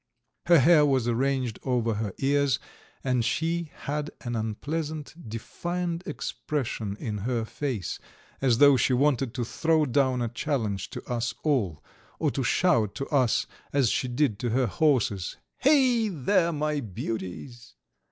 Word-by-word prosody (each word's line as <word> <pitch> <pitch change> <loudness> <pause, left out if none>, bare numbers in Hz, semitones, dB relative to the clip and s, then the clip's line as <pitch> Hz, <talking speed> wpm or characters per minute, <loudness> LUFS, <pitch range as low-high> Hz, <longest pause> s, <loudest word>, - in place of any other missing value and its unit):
Her 170 -1 +7
hair 150 +2 +6
was 135 -5 +2
arranged 125 -1 0
over 120 -3 0
her 105 -1 -2
ears, 140 -1 +2 0.5
and 125 -3 +1
she 165 +5 -1
had 150 +1 -2
an 120 -2 -4
unpleasant, 145 +8 -3 0.2
defiant 170 +9 -3
expression 120 -9 -3
in 105 -3 -3
her 115 +2 -1
face, 120 - -3 0.4
as 125 -4 +3
though 140 0 +7
she 130 - +2
wanted 135 -2 +2
to 120 -3 -1
throw 160 +5 +2
down 130 -1 +2
a - - 0
challenge 115 -5 -2
to - - -8
us 120 -2 -2
all, 120 - 0 0.3
or - - +1
to - - -2
shout 105 -3 +2
to 135 - -3
us 130 -6 +2 0.3
as 135 -5 +3
she 130 - 0
did 125 -4 0
to 120 - -1
her 125 +3 +2
horses: 115 - +1 0.2
"Hey, 255 -6 +4
there, 170 +1 +2
my 150 -1 -1
beauties!" 115 +3 -6
130 Hz, 145 wpm, -27 LUFS, 115-150 Hz, 0.5 s, Her